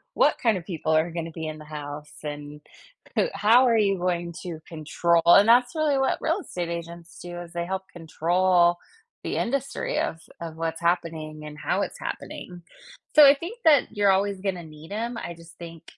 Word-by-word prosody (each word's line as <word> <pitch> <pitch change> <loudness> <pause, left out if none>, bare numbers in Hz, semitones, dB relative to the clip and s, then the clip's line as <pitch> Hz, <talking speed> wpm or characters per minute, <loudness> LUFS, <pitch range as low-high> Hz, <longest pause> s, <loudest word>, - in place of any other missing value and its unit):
what - - +3
kind 225 -5 +2
of 170 - -8
people 160 -4 -3
are 160 +2 +2
gonna 165 -1 -4
be 160 0 -5
in 155 0 -5
the 155 - -11
house?" 150 0 -7
And, 145 0 -7 0.5
"Who - - +3
how 220 +6 +5
are 230 - +4
you 200 -3 +2
going 175 -1 -1
to 170 -3 -6
control" 165 +1 +1
and 200 +5 +8
that's 245 +5 +5
really 300 -3 +2
what 270 - +1
real 330 +5 0
estate 175 - -5
agents 170 0 -7
do 175 0 -7
is 170 0 -11
they 170 0 -2
help 190 +1 -4
control 175 +1 +2 0.5
the - - -3
industry 275 - -1
of 160 - -2 0.2
of 165 -1 -6
what's 165 0 -3
happening 160 -3 -2
and 150 0 -9
how - - -1
it's - - -4
happening. 175 -1 -7 0.5
So, 300 -1 +10
I 280 - +9
think 350 +11 -7
that 285 -8 +4
you're 200 -1 +4
always 195 0 +1
gonna 190 -3 -2
need 155 +2 -13
'em, 230 +3 -3
I 170 - -5
just 165 0 -16
think, 165 -1 -10
175 Hz, 195 wpm, -25 LUFS, 165-205 Hz, 0.5 s, So